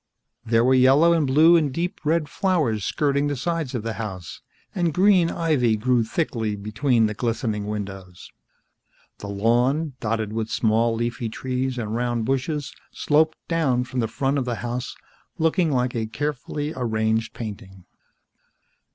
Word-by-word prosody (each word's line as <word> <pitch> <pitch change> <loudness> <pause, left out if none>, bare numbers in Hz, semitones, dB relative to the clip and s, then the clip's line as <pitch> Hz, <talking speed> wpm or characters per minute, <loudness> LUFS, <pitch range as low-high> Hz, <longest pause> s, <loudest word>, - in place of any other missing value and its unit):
There 115 0 +2
were 130 - +4
yellow 135 +6 +5
and 160 -4 +1
blue 155 +6 +6
and 155 -4 +2
deep 170 +6 -3
red 155 0 +1
flowers, 145 - 0
skirting 140 +2 0
the 145 - -1
sides 160 -1 -2
of 115 - -3
the 115 0 -3
house, 95 -6 -7 0.3
and 175 -5 0
green 185 -3 +4
ivy 140 -11 +1
grew 120 +1 +2
thickly 110 -4 -2
between 110 +4 +1
the 105 - -1
glistening 110 -2 -2
windows. 95 -4 -7 0.9
The 100 - -7
lawn, 120 +9 +1
dotted 110 -1 -2
with 110 -1 -2
small 115 +1 +1
leafy 120 0 -2
trees 130 +2 -3
and 110 -3 -3
round 120 -1 -1
bushes, 135 +2 -2 0.2
sloped 155 +1 +2
down 140 -7 +1
from 130 0 -4
the 115 - +1
front 135 +5 -1
of 130 - -2
the 120 -1 -2
house, 120 +2 -4 0.4
looking 165 +1 +2
like 125 -2 0
a 110 -1 -1
carefully 145 +3 -3
arranged 110 -2 -1
painting. 95 -4 -8
125 Hz, 150 wpm, -23 LUFS, 110-150 Hz, 0.9 s, blue